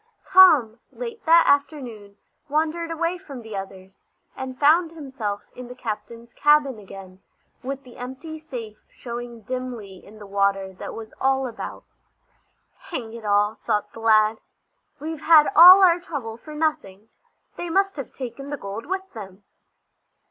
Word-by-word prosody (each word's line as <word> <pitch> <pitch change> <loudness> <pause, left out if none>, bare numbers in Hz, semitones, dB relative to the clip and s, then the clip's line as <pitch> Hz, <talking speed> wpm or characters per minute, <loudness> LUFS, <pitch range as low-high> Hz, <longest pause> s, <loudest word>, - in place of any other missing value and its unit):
Tom, 305 - +6
late 465 -2 -7
that 335 +1 +7
afternoon, 250 -9 -1 0.3
wandered 320 +3 -1
away 335 +2 -2
from 280 -10 -10
the 220 -2 -8
others, 195 0 -9 0.3
and 260 -1 -6
found 320 +3 +4
himself 260 -10 -5
in 250 -1 -9
the 250 - -10
captain's 235 0 -7
cabin 295 -5 +3
again, 190 -2 -12 0.4
with 275 +1 -5
the 250 -3 -15
empty 265 +6 -8
safe 240 -9 -8
showing 240 -1 -8
dimly 235 -5 -6
in 215 +2 -15
the 210 - -11
water 195 -1 0
that 185 - -8
was 225 -1 -9
all 265 0 +2
about. 240 - -7 1.1
"Hang 240 -11 -5
it 230 -2 -9
all!" 205 +1 +1
thought 210 - -1
the - - -10
lad, 220 -1 +3 0.6
"we've 310 +1 -6
had 315 -2 +6
all 365 +4 +10
our 350 -1 +5
trouble 275 -10 -6
for 300 +6 -12
nothing! 225 -10 -3 0.5
They 345 - -5
must 390 +3 +1
have 275 - -6
taken 275 +2 -8
the 290 - -4
gold 205 +4 -7
with 380 +1 -4
them." 200 -3 -10
250 Hz, 150 wpm, -23 LUFS, 215-310 Hz, 1.1 s, all